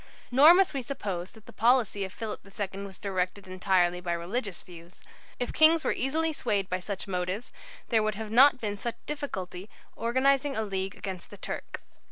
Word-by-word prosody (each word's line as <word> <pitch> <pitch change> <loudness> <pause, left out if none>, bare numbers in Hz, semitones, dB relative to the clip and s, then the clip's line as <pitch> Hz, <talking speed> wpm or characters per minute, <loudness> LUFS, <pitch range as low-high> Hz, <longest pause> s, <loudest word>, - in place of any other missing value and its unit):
Nor 295 +7 +8
must 380 -4 +3
we 275 - -2
suppose 200 -8 -5
that 220 -1 -17
the - - -13
policy 235 -4 +2
of 190 - -5
Philip 220 +1 -5
II 195 0 -5
was 195 -1 -10
directed 190 -1 -3
entirely 185 -1 +1
by 175 -1 -2
religious 185 +4 -3
views. 170 0 -13 0.4
If 245 - -2
kings 315 +1 +6
were - - +1
easily 315 +5 0
swayed 205 -9 -1
by 185 - -1
such 195 +1 -5
motives, 185 +4 -3 0.4
there 225 -2 +4
would 215 -1 0
have 215 0 -6
not 265 +3 +7
been 205 -3 -3
such 235 +3 -4
difficulty 190 -11 -5
about 220 - -22
organizing 270 +4 +2
a 220 - 0
League 195 -2 -3
against 190 -3 -7
the - - -11
Turk. - - -6
205 Hz, 190 wpm, -28 LUFS, 185-255 Hz, 0.4 s, Nor